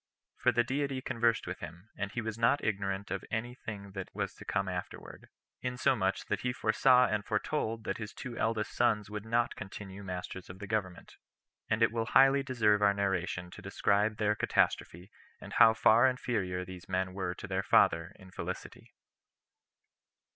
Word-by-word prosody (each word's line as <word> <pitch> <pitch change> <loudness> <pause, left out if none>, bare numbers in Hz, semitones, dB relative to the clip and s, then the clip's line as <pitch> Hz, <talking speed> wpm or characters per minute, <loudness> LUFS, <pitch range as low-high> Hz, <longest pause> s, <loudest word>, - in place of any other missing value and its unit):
For - - +3
the 120 - +3
Deity 135 +2 -1
conversed 120 -3 +1
with - - -5
him, 90 +7 -10
and 100 -1 -3
he 120 - -3
was 110 -1 -4
not 115 +5 +2
ignorant 100 -1 -2
of - - -2
any 120 +2 -3
thing 100 -5 -8
that 95 -1 -6
was - - -2
to - - -12
come 95 0 -1
afterward; 90 -1 -7 0.3
insomuch 125 -6 0
that - - -1
he 125 0 -1
foresaw 125 +2 +4
and 105 -3 -1
foretold 110 +1 -2
that 95 - -3
his 110 -1 -5
two 125 -3 -7
eldest 110 -2 -1
sons 105 -4 +1
would 105 +1 -6
not 115 +1 +1
continue 95 -1 -8
masters 90 0 -6
of 90 - -9
the 100 - -7
government; 100 -4 -4 0.5
and 110 +2 +2
it 115 - +4
will 115 -1 -2
highly 135 +2 +6
deserve 110 -6 +2
our 100 -1 +4
narration 95 -2 -1
to - - -11
describe 105 +2 +1
their 105 -1 +2
catastrophe, 90 -3 0 0.3
and - - -10
how 115 - +8
far 110 +2 +5
inferior 95 -8 -2
these 90 0 -10
men 95 0 -1
were 90 -2 -3
to - - -8
their 95 0 -1
father 85 -2 +3
in 95 -2 -15
felicity. - - -7
105 Hz, 175 wpm, -31 LUFS, 95-115 Hz, 0.5 s, how